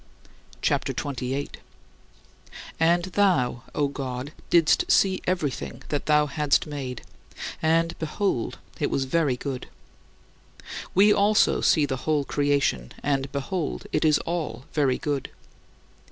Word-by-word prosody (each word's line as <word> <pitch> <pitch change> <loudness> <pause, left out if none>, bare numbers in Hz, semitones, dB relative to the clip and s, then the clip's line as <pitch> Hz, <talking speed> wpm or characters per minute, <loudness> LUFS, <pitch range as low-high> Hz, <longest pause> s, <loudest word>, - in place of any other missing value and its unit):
CHAPTER - - +1
XXVIII 130 -3 -3
43. 140 +2 -4 1.2
And 170 +2 +3
thou, 180 -11 +1
O 145 - +2
God, 135 0 -5 0.2
didst 160 -3 +4
see 190 -1 +3
everything 165 -7 -2
that 145 -1 -2
thou 150 -1 +4
hadst 150 0 +1
made 135 -5 -5 0.6
and, 165 +1 +2
behold, 160 - -1 0.2
it - - +1
was 135 - 0
very 140 -2 +1
good. 130 -1 -5 1.3
We 205 +3 +6
also 205 +1 +3
see 155 -3 +4
the 130 -2 -2
whole 150 +1 0
creation 140 - 0
and, 135 -1 0
behold, 145 +4 -3
it 155 - +1
is 155 -1 +5
all 150 -8 -3
very 140 -4 +2
good. 145 -3 -2
145 Hz, 125 wpm, -25 LUFS, 135-165 Hz, 1.3 s, We